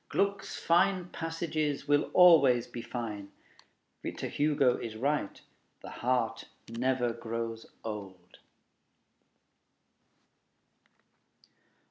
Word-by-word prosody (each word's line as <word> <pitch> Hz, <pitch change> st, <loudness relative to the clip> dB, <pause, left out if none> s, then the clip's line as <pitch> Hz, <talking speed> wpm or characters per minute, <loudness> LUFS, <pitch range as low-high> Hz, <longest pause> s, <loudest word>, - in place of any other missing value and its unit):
Gluck's 200 Hz, 0 st, -1 dB
fine 180 Hz, +1 st, +2 dB
passages 160 Hz, -4 st, -3 dB
will 145 Hz, 0 st, +2 dB
always 140 Hz, -10 st, +7 dB
be 120 Hz, -, -7 dB
fine. 115 Hz, -4 st, -6 dB, 0.7 s
Victor -, -, -5 dB
Hugo 145 Hz, -4 st, +2 dB
is 110 Hz, -2 st, -6 dB
right: 140 Hz, -2 st, -1 dB, 0.4 s
the -, -, -8 dB
heart 120 Hz, -2 st, -1 dB, 0.2 s
never 125 Hz, +1 st, 0 dB
grows 115 Hz, 0 st, -5 dB, 0.2 s
old. 95 Hz, -5 st, -8 dB
125 Hz, 80 wpm, -30 LUFS, 115-155 Hz, 0.7 s, always